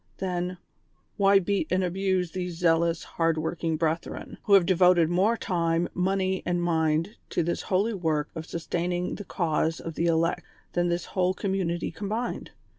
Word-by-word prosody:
Then, 180 -1 -2 0.6
why 200 -1 +5
beat 195 -3 0
and 185 +1 +2
abuse 185 -1 0
these 180 -2 -4
zealous, 165 -1 +2
hard 165 -1 0
working 160 0 -1
brethren, 165 +1 -3
who 205 -3 +6
have 190 -3 +6
devoted 180 -2 +4
more 200 +6 +3
time, 170 -3 0
money 190 +1 0
and 175 0 0
mind 165 +3 0
to 175 - 0
this 170 +2 -1
holy 200 +5 +1
work 160 -6 -1
of 160 -1 -7
sustaining 175 +1 -2
the 205 - -6
cause 160 -3 0
of 165 - -6
the 170 +2 0
elect 165 +1 +1 0.3
than 175 0 +1
this 170 0 -1
whole 185 0 0
community 185 -3 -1
combined 215 +7 -3
175 Hz, 160 wpm, -27 LUFS, 165-190 Hz, 0.6 s, who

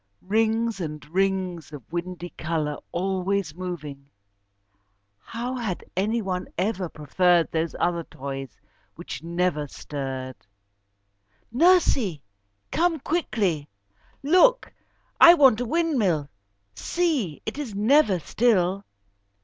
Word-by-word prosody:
Rings 220 +1 +1
and 150 -2 -6
rings 185 -2 -1
of 145 -4 -9
windy 175 0 -4
colour 155 -2 -2
always 190 -1 -1
moving! 150 -6 -7 1.1
How 240 - -5
had 215 -7 -3
any 215 +5 0
one 185 -1 -3
ever 185 -1 -1
preferred 170 +3 +2
those 160 0 -1
other 170 -1 0
toys 135 -4 -7 0.4
which - - -7
never 170 -3 -1
stirred. 130 -3 -6 1.2
"Nursie, 270 - +3 0.5
come 330 0 +1
quickly. 210 - -1 0.5
Look! 370 - +4 0.5
I 340 +1 +10
want 265 -7 +5
a - - -1
windmill. 230 - 0 0.4
See! 255 - -1
It 220 +7 -5
is 245 -9 -5
never 215 -1 +4
still. 195 0 +1
185 Hz, 100 wpm, -25 LUFS, 160-235 Hz, 1.2 s, I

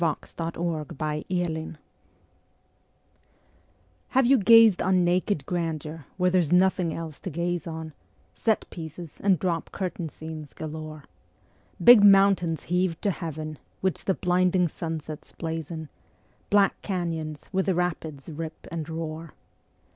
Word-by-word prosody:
The - - +3
Call 165 0 -4
of 150 -2 -6
the - - -9
Wild 160 +1 -2 2.3
Have 265 -1 +3
you 265 +2 +6
gazed 225 -1 +7
on 185 0 +3
naked 175 -3 +1
grandeur 160 -3 -3
where 180 -1 +2
there's 175 -5 +2
nothing 180 -1 +3
else 160 -2 -6
to - - -5
gaze 170 +2 -2
on, 160 -1 -6 0.4
Set 220 -2 0
pieces 160 -1 -8
and 195 -2 +3
drop 170 0 -2
curtain 180 -3 -4
scenes 155 -1 -9
galore, 155 -1 -7 0.8
Big 240 -3 +9
mountains 195 -5 +5
heaved 180 -1 0
to 200 - +2
heaven, 155 -4 -5 0.2
which 190 -2 -1
the 190 - +2
blinding 180 0 +2
sunsets 160 -2 -6
blazon, 160 -1 -5 0.6
Black 200 -1 +3
canyons 165 -5 -3
where 190 -1 +1
the 190 - +1
rapids 160 -5 -3
rip 160 0 -7
and 165 -1 -4
roar? 160 -1 -5
170 Hz, 130 wpm, -26 LUFS, 160-185 Hz, 2.3 s, Big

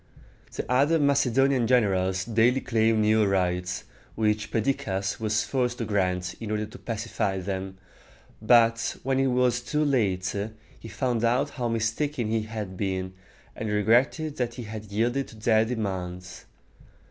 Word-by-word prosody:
The - - -4
other 140 +6 +3
Macedonian 135 -3 +2
generals 95 -6 +2
daily 115 +3 +3
claimed 110 -3 +2
new 110 +1 +4
rights, 90 -2 0 0.3
which 105 -1 0
Perdiccas 100 -5 -1
was 110 0 0
forced 125 -2 -1
to 115 - -3
grant 90 -4 -1
in 110 - -6
order 105 0 -1
to 105 - -12
pacify 110 -3 -2
them; 95 0 -4 0.6
but 115 +1 +3
when 135 0 +1
it 135 - +3
was 125 -1 +2
too 150 +6 0
late, 100 -10 0 0.4
he - - -10
found 120 -1 -1
out 125 +5 +2
how 125 -3 -3
mistaken 115 +3 -1
he 115 0 +1
had 110 -3 -6
been, 95 -1 -3 0.4
and 110 - -4
regretted 120 +9 +2
that 120 -2 -2
he 125 - -6
had 110 0 -7
yielded 120 +6 0
to - - -13
their 110 0 +3
demands. 95 -6 -5
110 Hz, 145 wpm, -26 LUFS, 100-125 Hz, 0.6 s, new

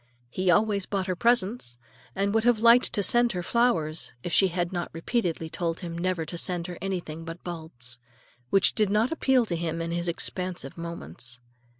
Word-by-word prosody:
He 185 +5 0
always 200 +1 +3
bought 195 -2 -1
her 185 -1 -1
presents, 220 - +1 0.4
and 200 +1 0
would 225 0 +2
have 245 -1 +4
liked 235 +3 +5
to 205 - +1
send 240 +3 +4
her 180 -1 -3
flowers 180 -9 +2
if 175 - -4
she 195 - +5
had 175 0 -2
not 175 -1 -2
repeatedly 165 -1 -1
told 165 +1 -3
him 170 -2 -5
never 175 -1 -1
to 170 +2 -5
send 175 -2 -3
her 175 -1 -7
anything 175 -4 -4
but 165 +1 -8
bulbs,—which 125 -2 -2
did 215 -3 +2
not 215 +4 +2
appeal 265 -6 +3
to 175 - -2
him 165 0 -2
in 165 0 -3
his 170 +1 -1
expansive 175 -3 -3
moments. 125 - -7
175 Hz, 185 wpm, -27 LUFS, 165-205 Hz, 0.4 s, liked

